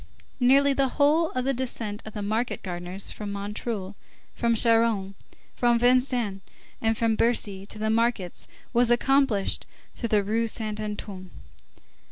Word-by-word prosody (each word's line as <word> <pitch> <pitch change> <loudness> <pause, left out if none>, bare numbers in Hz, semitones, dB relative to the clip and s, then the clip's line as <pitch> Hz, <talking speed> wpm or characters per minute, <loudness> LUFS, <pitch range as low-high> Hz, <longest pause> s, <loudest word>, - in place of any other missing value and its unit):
Nearly 275 +3 +5
the 275 0 +2
whole 305 +3 +4
of 255 0 -1
the 275 - +1
descent 230 -5 -3
of 220 - -8
the 210 - -3
market 220 +4 -2
gardeners 180 +1 -4
from 205 -1 -6
Montreuil, 200 0 -4 0.4
from 235 -1 +1
Charonne, 225 -4 +3 0.4
from 240 -1 +2
Vincennes, 245 -4 +2 0.4
and 225 0 +1
from 230 -1 +2
Bercy 205 -4 0
to - - -5
the 220 +1 0
markets 225 -5 -1 0.3
was 240 0 +3
accomplished 240 -4 +2 0.3
through 235 - -4
the 210 -1 +3
Rue 225 +3 0
Saint 215 -1 -3
Antoine. 205 -3 -6
225 Hz, 145 wpm, -26 LUFS, 205-245 Hz, 0.4 s, Nearly